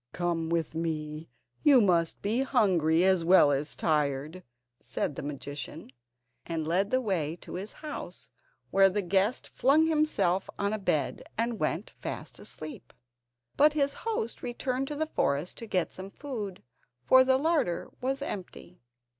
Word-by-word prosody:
"Come 170 -2 -1
with 165 -2 -1
me, 155 -2 -4 0.3
you 285 -4 +7
must 175 -6 +2
be 215 +5 +1
hungry 180 - +3
as 185 -2 +3
well 165 -4 +6
as 140 +2 -1
tired," 150 +2 0 0.4
said 145 - -3
the - - -5
magician, 145 +1 -6 0.5
and 160 -2 -3
led 190 +5 +1
the 255 - +2
way 175 - -1
to - - -10
his 195 +4 -5
house, 300 - -7 0.4
where 195 0 +6
the 200 +2 -1
guest 195 +6 +1
flung 295 +5 +3
himself 305 - +1
on 200 +1 0
a 215 - -2
bed, 155 -6 0 0.2
and 230 0 -1
went - - -1
fast - - -6
asleep. 155 0 -4 0.6
But 300 +1 +5
his 280 -2 +1
host 430 - -2
returned 255 +2 -2
to 295 - -4
the 315 +2 0
forest 140 +5 0
to 230 - -7
get 185 -4 -1
some 190 +1 -7
food, 210 -7 -6 0.4
for 260 0 +7
the 260 0 +4
larder 295 - 0
was 270 +2 -1
empty. 180 -5 -7
190 Hz, 155 wpm, -29 LUFS, 165-255 Hz, 0.6 s, you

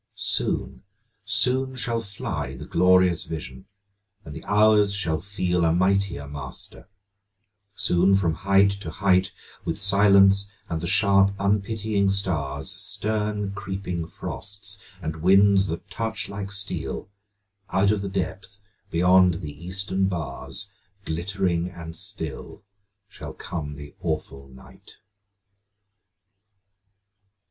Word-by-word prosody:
Soon, - - -2 0.4
soon 130 +1 +1
shall 120 -2 -1
fly 80 - -5
The - - -8
glorious 90 -1 +3
vision, 65 -3 -7 0.6
and 75 - -8
the - - -8
hours 105 -1 +4
shall 80 -5 -1
feel 90 -3 -1
A 80 - +4
mightier 95 -4 +1
master; 70 -2 -9 0.9
soon 90 +3 +3
from 90 -4 +1
height 100 +3 +3
to 80 - -5
height, 95 +2 +2 0.3
With 80 - -2
silence 100 -1 +5 0.2
and 80 -1 -3
the 85 - -3
sharp 100 0 +4
unpitying 100 0 +1
stars, 75 -9 0
Stern 105 -1 -2
creeping 95 -4 -4
frosts, 100 +3 -3 0.2
and 80 0 -3
winds 95 +2 +5
that 80 +1 -5
touch 110 -3 -3
like 100 0 -6
steel, 100 0 -3 0.6
Out 95 +2 +3
of 105 -2 0
the 100 - -3
depth 95 +1 -4 0.3
beyond 90 0 +5
the 80 -4 -6
eastern 95 +1 0
bars, 80 +2 -4 0.3
Glittering 90 +1 -1
and 85 -2 -9
still 90 -5 -5 0.4
shall - - -9
come 75 -4 -5
the 70 0 -10
awful 70 0 -4
night. 65 0 -16
95 Hz, 115 wpm, -25 LUFS, 85-100 Hz, 0.9 s, silence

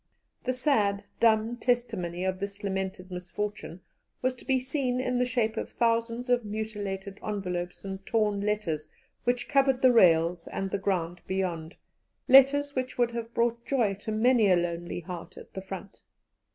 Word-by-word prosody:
The 255 - +1
sad, 215 -7 +1 0.2
dumb 225 +1 +3
testimony 220 -9 -1
of 185 0 -1
this 200 +1 -5
lamented 190 -1 -3
misfortune 180 0 -5 0.4
was 255 0 +2
to - - -13
be 265 -1 +3
seen 255 -1 -1
in 250 -1 0
the 250 - +2
shape 230 -2 0
of - - -3
thousands 230 +1 0
of 245 -1 +2
mutilated 205 -2 -5
envelopes 180 -4 -4
and 190 0 -6
torn 210 -2 +1
letters 185 -8 -1 0.4
which 245 0 0
covered 270 -2 +3
the 255 -1 +7
rails 170 -4 +4
and 195 -1 -3
the 200 - -1
ground 175 -3 -1
beyond 180 -3 -2 0.5
letters 280 +2 +6
which 255 -1 -2
would 240 -1 +2
have 235 -1 -5
brought 235 0 +1
joy 235 -8 +1
to 220 - -5
many 225 0 +4
a 185 - +6
lonely 175 0 -2
heart 175 0 -8
at - - -12
the 190 - -5
front. 195 +1 -8
210 Hz, 165 wpm, -28 LUFS, 185-245 Hz, 0.5 s, the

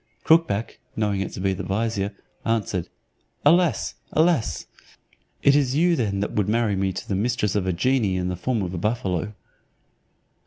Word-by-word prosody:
Crookback, 160 -10 +2 0.2
knowing 105 -3 0
it 95 - -3
to - - -6
be 95 0 +1
the 95 - -5
vizier. 100 +1 -1 0.3
answered, 105 -6 -1 0.6
"Alas! 170 +3 +3 0.2
alas! 155 - +2 0.8
it 140 - +6
is 135 -3 +2
you 170 +3 +4
then 100 -7 -1
that 100 - -2
would 105 -1 0
marry 110 -2 +1
me 95 0 0
to 95 - -6
the - - -2
mistress 105 0 0
of 95 -2 0
a - - +2
genie 105 +1 +1
in 90 0 -1
the 90 - -2
form 110 +4 -1
of 90 -1 -4
a 90 - -3
buffalo." 105 -2 -1
105 Hz, 170 wpm, -24 LUFS, 95-125 Hz, 0.8 s, it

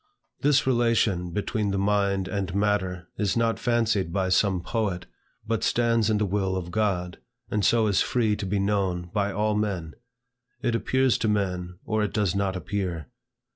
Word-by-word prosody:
This 145 0 +3
relation 115 -8 +2
between 105 +3 -1
the 100 - -1
mind 100 -1 +1
and 95 -2 -3
matter 95 -3 0
is 105 +1 +1
not 115 -1 +1
fancied 110 -7 +1
by 95 +1 0
some 95 0 +2
poet, 100 -1 -2 0.4
but 115 -1 -1
stands 115 -2 +2
in 110 - +2
the 105 - +1
will 95 -1 0
of 90 -1 -5
God, 90 -4 -1 0.3
and 105 -1 0
so 115 +1 +4
is 100 -3 +2
free 110 -4 +1
to 100 - -4
be 100 +2 0
known 95 -3 -1
by 100 -1 0
all 105 +2 0
men. 95 -6 -2 0.7
It 120 -2 +1
appears 130 +2 +2
to 110 - 0
men, 90 -4 -1
or 110 0 0
it 105 - -2
does 100 -5 +1
not 100 -1 0
appear. 90 -3 -3
100 Hz, 175 wpm, -26 LUFS, 95-110 Hz, 0.7 s, so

